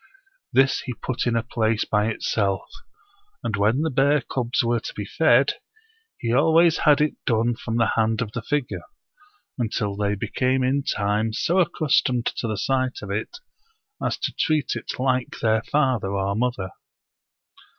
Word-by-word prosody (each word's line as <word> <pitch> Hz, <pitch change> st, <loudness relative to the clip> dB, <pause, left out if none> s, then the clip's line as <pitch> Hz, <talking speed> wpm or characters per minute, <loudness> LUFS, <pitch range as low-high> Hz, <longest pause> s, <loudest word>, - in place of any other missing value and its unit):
This 135 Hz, 0 st, +3 dB
he 125 Hz, -, -5 dB
put 130 Hz, +1 st, -3 dB
in 120 Hz, -, +1 dB
a 115 Hz, -, +1 dB
place 110 Hz, -2 st, 0 dB
by 105 Hz, 0 st, +1 dB
itself; 100 Hz, -3 st, -1 dB, 0.8 s
and 110 Hz, -, -1 dB
when 105 Hz, +7 st, +2 dB
the 160 Hz, -, 0 dB
bear 140 Hz, +2 st, +3 dB
cubs 125 Hz, +1 st, -1 dB
were 120 Hz, 0 st, +1 dB
to -, -, -7 dB
be 105 Hz, -, -4 dB
fed, 140 Hz, +2 st, +3 dB, 0.6 s
he 115 Hz, -1 st, -2 dB
always 160 Hz, +4 st, +4 dB
had 150 Hz, 0 st, +5 dB
it 150 Hz, -, 0 dB
done 115 Hz, 0 st, +1 dB
from 115 Hz, 0 st, -4 dB
the 115 Hz, -1 st, +2 dB
hand 110 Hz, 0 st, +1 dB
of 120 Hz, -4 st, -2 dB
the 120 Hz, -, -4 dB
figure, 145 Hz, +2 st, -2 dB, 0.8 s
until 105 Hz, -3 st, -1 dB
they 100 Hz, 0 st, 0 dB
became 130 Hz, +5 st, 0 dB
in 135 Hz, +2 st, +1 dB
time 105 Hz, -1 st, 0 dB
so 175 Hz, +10 st, +1 dB
accustomed 145 Hz, -8 st, +1 dB
to 115 Hz, -, -2 dB
the 110 Hz, -2 st, -2 dB
sight 130 Hz, -2 st, -1 dB
of 100 Hz, -, -6 dB
it 105 Hz, +2 st, -3 dB, 0.7 s
as -, -, 0 dB
to -, -, -3 dB
treat 155 Hz, -5 st, 0 dB
it -, -, -5 dB
like 130 Hz, -1 st, 0 dB
their 110 Hz, -1 st, +2 dB
father 130 Hz, -8 st, 0 dB
or 100 Hz, 0 st, 0 dB
mother. 110 Hz, -5 st, -1 dB
120 Hz, 165 wpm, -23 LUFS, 110-135 Hz, 0.8 s, had